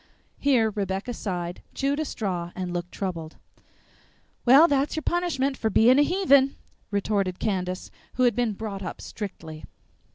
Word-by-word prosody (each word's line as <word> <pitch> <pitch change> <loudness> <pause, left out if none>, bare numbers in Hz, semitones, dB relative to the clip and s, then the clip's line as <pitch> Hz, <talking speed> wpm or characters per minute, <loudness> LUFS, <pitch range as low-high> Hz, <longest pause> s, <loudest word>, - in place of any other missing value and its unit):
Here 245 -6 +3
Rebecca 195 +3 -3
sighed, 180 -5 -4
chewed 280 +2 0
a 310 - -1
straw, 180 -9 -3
and 180 -1 -4
looked 175 0 -4
troubled. 170 -5 -5 1.1
"Well, 275 +7 +8
that's 280 -1 +1
your 315 - -3
punishment 295 -6 0
for 220 - 0
being 245 +6 +5
a - - +7
heathen," 285 -5 +4 0.3
retorted 200 -2 0
Candace, 185 -3 -2 0.2
who 255 - +2
had 240 -4 +4
been 240 -3 +1
brought 200 -1 -5
up 185 - -6
strictly. 165 -7 -7
215 Hz, 150 wpm, -26 LUFS, 185-270 Hz, 1.1 s, Well